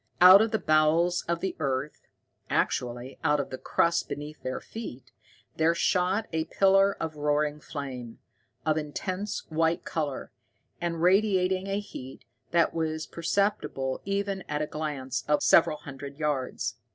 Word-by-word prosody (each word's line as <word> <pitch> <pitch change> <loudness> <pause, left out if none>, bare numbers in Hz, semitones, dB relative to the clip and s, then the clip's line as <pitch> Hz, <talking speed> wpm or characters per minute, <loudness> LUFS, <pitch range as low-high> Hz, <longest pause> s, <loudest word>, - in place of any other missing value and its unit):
Out 185 +3 +10
of 225 - +2
the 220 - +1
bowels 160 +2 +3
of 170 0 -1
the 190 - -2
earth 140 0 -3 0.4
actually 125 +1 -1
out 150 -2 +3
of 140 - -3
the 130 - -5
crust 170 0 +1
beneath 150 +2 -6
their 130 - -3
feet 215 - -9 0.5
there 160 +1 +3
shot 185 +4 +1
a 160 0 0
pillar 195 +3 +3
of 160 -2 -4
roaring 150 0 0
flame, 130 -6 -7 0.5
of 155 0 +2
intense 185 +7 -4
white 165 +1 +1
color, 150 -5 -3 0.5
and 170 -1 -2
radiating 190 0 +3
a 195 +1 -1
heat 130 -10 -9 0.2
that 170 -1 +2
was 160 -1 -2
perceptible 170 -7 -1
even 200 0 -2
at 150 0 -1
a - - 0
distance 135 -6 -4
of 150 0 +2
several 155 -2 +5
hundred 140 0 -9
yards. 145 -4 -2
160 Hz, 145 wpm, -28 LUFS, 145-185 Hz, 0.5 s, Out